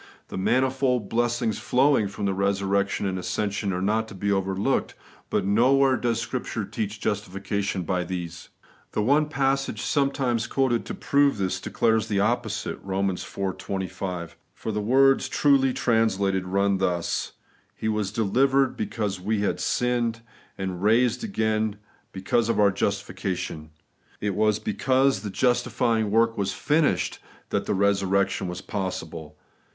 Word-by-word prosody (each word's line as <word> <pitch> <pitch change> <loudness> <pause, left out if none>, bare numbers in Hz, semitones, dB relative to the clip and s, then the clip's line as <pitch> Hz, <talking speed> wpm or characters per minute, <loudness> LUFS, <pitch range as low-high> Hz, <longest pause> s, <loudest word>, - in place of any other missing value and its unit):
The - - -5
manifold 130 0 +1
blessings 120 -2 0
flowing 130 -4 +3
from 100 +1 -5
resur 100 0 0
rection 100 0 0
and 95 -1 -2
ascension 100 +1 -2
are 90 0 -2
not 110 +2 +1
to 105 - -10
be 100 +2 -1
overlooked; 95 +6 0 0.3
but - - 0
nowhere 130 +6 +4
does 120 -2 0
Scripture 115 -2 -3
teach 105 +1 -4
justification 100 -2 -2
by 90 +1 -1
these. 85 -1 -6 0.4
The 105 - 0
one 145 +6 +3
passage 135 -6 0
sometimes 130 -4 0
quoted 125 -2 0
to - - -4
prove 140 -3 +2
this, 95 -1 -1
declares 110 -1 +1
the 100 -2 0
opposite 110 0 -1
(Eom. 95 0 0 0.4
iv. - - -14
25); 90 -3 -4 0.2
for 110 - -4
the 105 0 -2
words 135 +5 +4
truly 135 -2 +3
translated 100 -6 +1
run 100 +1 +1
thus: 90 -3 -1 0.2
* - - -37
He 110 - -4
was 105 -3 -1
delivered 130 +6 +2
because 105 - -3
we 105 +2 0
had 105 - 0
sinned, 120 -2 0 0.4
and 95 -2 -4
raised 115 - +3
again 110 - 0 0.4
hecause 105 +4 0
of 115 - +1
our 100 -1 +5
justi 100 -1 -2
fication/ 90 -5 -4 0.5
It 105 -1 -1
was 105 +1 +2
because 130 +6 +1
the 105 - -5
justifying 115 0 +1
work 115 +1 +2
was 100 -1 0
finished 150 0 +1 0.3
that - - -1
resurrection 100 -1 +1
was 90 0 -5
possible. 80 -5 -5
105 Hz, 145 wpm, -25 LUFS, 95-120 Hz, 0.5 s, our